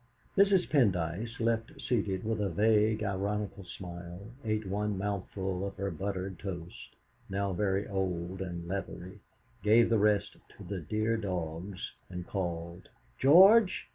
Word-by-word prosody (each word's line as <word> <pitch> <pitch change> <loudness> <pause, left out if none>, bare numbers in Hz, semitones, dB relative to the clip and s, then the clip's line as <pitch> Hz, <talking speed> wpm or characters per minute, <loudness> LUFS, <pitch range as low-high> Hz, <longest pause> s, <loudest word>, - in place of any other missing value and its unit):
Mrs. 195 -2 +4
Pendyce, 105 - +1
left 115 -1 -1
seated 105 -6 -1
with 110 -1 -1
a 100 - +1
vague, 110 +3 +3
ironical 100 0 -2
smile, 90 +3 -8
ate 110 -1 -1
one 100 +1 -1
mouthful 95 -1 -3
of 100 0 -4
her 100 0 -2
buttered 95 +1 -4
toast, 90 -3 -7 0.3
now 100 0 -1
very 100 +1 0
old 95 -2 -2
and 85 -2 -5
leathery, 95 -1 -5 0.4
gave 115 +3 +5
the 115 - +4
rest 105 -1 +2 0.2
to - - -10
"the 100 -2 -4
dear 110 +7 0
dogs," 90 -2 -4 0.2
and 90 -1 -6
called: 85 -2 -4 0.3
"George! 190 +8 +7
100 Hz, 135 wpm, -31 LUFS, 90-110 Hz, 0.4 s, George